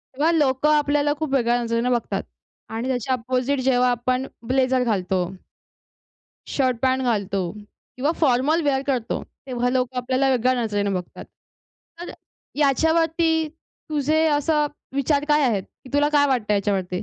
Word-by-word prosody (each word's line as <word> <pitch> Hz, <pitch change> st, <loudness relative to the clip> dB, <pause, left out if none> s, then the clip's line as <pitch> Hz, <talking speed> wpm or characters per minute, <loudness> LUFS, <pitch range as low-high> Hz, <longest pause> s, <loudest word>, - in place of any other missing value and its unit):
तेव्हा 310 Hz, +4 st, +2 dB
लोकं 295 Hz, -2 st, +2 dB
आपल्याला 290 Hz, 0 st, +2 dB
खूप 310 Hz, -3 st, -3 dB
वेगळ्या 240 Hz, -2 st, +2 dB
नजरेने 230 Hz, +1 st, 0 dB
बघतात 240 Hz, -2 st, -1 dB, 0.5 s
आणि 230 Hz, +3 st, -3 dB
त्याच्या 260 Hz, 0 st, -1 dB
अपोझिट 255 Hz, +2 st, -1 dB
जेव्हा 250 Hz, -1 st, +3 dB
आपण 255 Hz, +2 st, -1 dB, 0.2 s
ब्लेझर 255 Hz, 0 st, +2 dB
घालतो 190 Hz, -5 st, 0 dB, 1.3 s
शर्ट-पॅन्ट 260 Hz, 0 st, +1 dB
घालतो 200 Hz, -5 st, 0 dB
किंवा 215 Hz, +6 st, -5 dB
फॉर्मल 295 Hz, +3 st, +2 dB
वेअर 270 Hz, -2 st, +1 dB
करतो. 255 Hz, -4 st, -1 dB, 0.2 s
तेव्हा 245 Hz, -1 st, -1 dB
लोकं 255 Hz, 0 st, -1 dB
आपल्याला 260 Hz, +2 st, +1 dB
वेगळ्या 255 Hz, 0 st, +2 dB
नजरेने 205 Hz, -2 st, -1 dB
बघतात. 180 Hz, -1 st, -6 dB, 0.8 s
तर 350 Hz, -, -6 dB, 0.5 s
याच्यावरती 320 Hz, +2 st, +2 dB
तुझे 310 Hz, 0 st, -2 dB
असे 300 Hz, +1 st, +2 dB, 0.3 s
विचार 285 Hz, +1 st, +1 dB
काय 300 Hz, 0 st, +4 dB
आहेत, 215 Hz, -7 st, +1 dB
की 255 Hz, -, -18 dB
तुला 290 Hz, +1 st, +3 dB
काय 285 Hz, -1 st, +4 dB
वाटतंय 225 Hz, -6 st, +1 dB
याच्यावरती? 190 Hz, -2 st, -1 dB
260 Hz, 135 wpm, -23 LUFS, 240-290 Hz, 1.3 s, काय